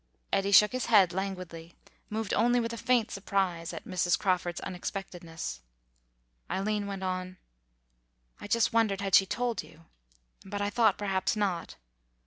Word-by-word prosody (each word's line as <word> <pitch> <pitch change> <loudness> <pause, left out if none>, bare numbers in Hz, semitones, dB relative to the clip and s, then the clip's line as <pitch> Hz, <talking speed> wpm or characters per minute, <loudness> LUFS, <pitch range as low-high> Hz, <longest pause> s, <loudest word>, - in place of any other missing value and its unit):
Eddy 195 +1 +2
shook 210 +1 +7
his 255 0 -2
head, 195 -6 +5
languidly, 180 -3 -5 0.3
moved 220 -1 -3
only 240 +2 +3
with 230 0 -2
a - - -3
faint 240 -1 +1
surprise 190 -4 -1
at - - -8
Mrs. 180 -4 +1
Crawford's 180 -3 0
unexpectedness. 175 - -6 0.9
Eileen 205 +1 -1
went 195 -1 -5
on, 185 0 -3 1.0
"I - - -8
just 230 +3 +2
wondered 215 -4 +2
had 195 -1 -3
she 195 - +7
told 240 +2 -1
you. 165 +1 -17 0.6
But 205 +1 -5
I 205 0 -1
thought 225 +1 +3
perhaps 195 -1 0
not.... 195 -5 -2
195 Hz, 145 wpm, -29 LUFS, 185-215 Hz, 1.0 s, shook